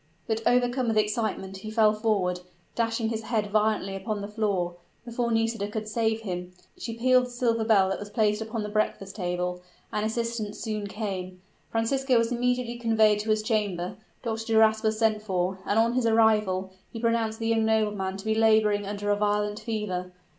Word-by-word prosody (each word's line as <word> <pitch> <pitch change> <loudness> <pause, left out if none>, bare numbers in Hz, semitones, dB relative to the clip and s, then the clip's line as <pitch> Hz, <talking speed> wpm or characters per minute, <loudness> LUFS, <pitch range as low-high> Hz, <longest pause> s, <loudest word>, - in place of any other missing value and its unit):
But, 225 0 -1
overcome 245 +1 +2
with 225 -1 +1
excitement, 210 -3 -1
he 215 +3 -7
fell 215 -1 +4
forward 205 -5 0 0.3
dashing 225 -1 0
his 225 -1 -2
head 220 -2 -1
violently 210 -2 +1
upon 205 +2 -3
the 200 - -4
floor, 200 -5 -1 0.3
before 235 0 -2
Nisida 225 -2 0
could 215 +1 -4
save 220 0 0
him. 180 -3 -5 0.2
She 230 - -6
pealed 255 +1 +4
the - - -12
silver 240 -2 0
bell 205 -4 +4
that 195 - -2
was 205 - -7
placed 210 0 +1
upon 220 0 -3
the 210 - -4
breakfast 205 -2 -1
table, 180 -1 -2 0.3
and 210 - 0
assistance 225 -1 -2
soon 215 -2 -3
came. 190 -3 -5 0.3
Francisco 255 +3 +1
was 230 +1 +1
immediately 245 0 0
conveyed 220 -3 +3
to 215 +1 -4
his 215 0 +2
chamber 205 -6 -1 0.3
Dr. 225 -1 -3
Duras 220 0 +5
was 220 -1 +1
sent 220 -1 +2
for 185 -2 -1
and 205 - +1
on 230 +1 +3
his 250 -2 +1
arrival, 210 -4 +3 0.2
he 230 - -6
pronounced 230 -1 0
the 225 0 -2
young 225 -1 +2
nobleman 210 -3 0
to 195 - -10
be 220 - +2
laboring 215 -2 +3
under 205 0 -2
a - - +4
violent 210 0 0
fever. 195 -5 -3
215 Hz, 185 wpm, -27 LUFS, 205-225 Hz, 0.3 s, Duras